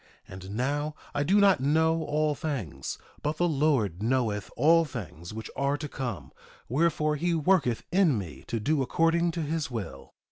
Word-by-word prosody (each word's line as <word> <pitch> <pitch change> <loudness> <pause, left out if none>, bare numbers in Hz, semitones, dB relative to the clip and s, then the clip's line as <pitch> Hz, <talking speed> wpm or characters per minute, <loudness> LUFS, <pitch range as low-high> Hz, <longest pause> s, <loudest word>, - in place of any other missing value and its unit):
And 95 +2 -8
now, 145 +4 -1 0.2
I 145 - 0
do 190 +8 +3
not 200 -2 +5
know 160 +4 +2
all 150 0 +1
things; 125 - -4 0.2
but 150 +1 -2
the 175 - +2
Lord 135 - +1
knoweth 110 -4 0
all 165 +5 +5
things 90 - -7
which 110 0 -6
are 140 +1 0
to 150 - -5
come; 125 - -5 0.4
wherefore, 150 +2 +1
he 170 +3 0
worketh 155 -7 +2
in 175 - +4
me 90 -7 -7
to 115 - -2
do 145 +6 +1
according 165 +5 +2
to 165 -1 -2
his 155 0 -2
will. 115 -5 -7
145 Hz, 170 wpm, -28 LUFS, 115-160 Hz, 0.4 s, not